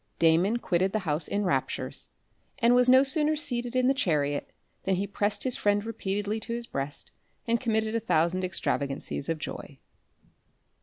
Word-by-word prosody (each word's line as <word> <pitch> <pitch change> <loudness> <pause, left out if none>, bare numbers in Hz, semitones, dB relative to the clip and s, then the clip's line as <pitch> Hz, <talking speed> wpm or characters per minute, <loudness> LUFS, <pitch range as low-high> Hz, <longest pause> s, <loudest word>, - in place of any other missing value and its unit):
Damon 170 +7 +3
quitted 190 -4 0
the - - +2
house 150 0 +2
in 205 +1 -1
raptures, 185 - -2 0.5
and 235 0 +4
was 250 0 +4
no 260 +1 +7
sooner 300 +3 +5
seated 245 -4 -1
in 255 0 +2
the 270 - +4
chariot, 145 - 0 0.3
than 190 - 0
he 195 +2 -1
pressed 205 +1 -1
his 255 -2 +1
friend 205 0 +1
repeatedly 205 -1 -3
to 230 - -5
his 235 0 -3
breast, 140 -6 -5 0.3
and 235 0 +1
committed 220 -2 0
a 230 - +1
thousand 180 -3 +1
extravagancies 140 -5 -2
of 165 - 0
joy. 145 -2 -7
205 Hz, 165 wpm, -27 LUFS, 170-240 Hz, 0.5 s, no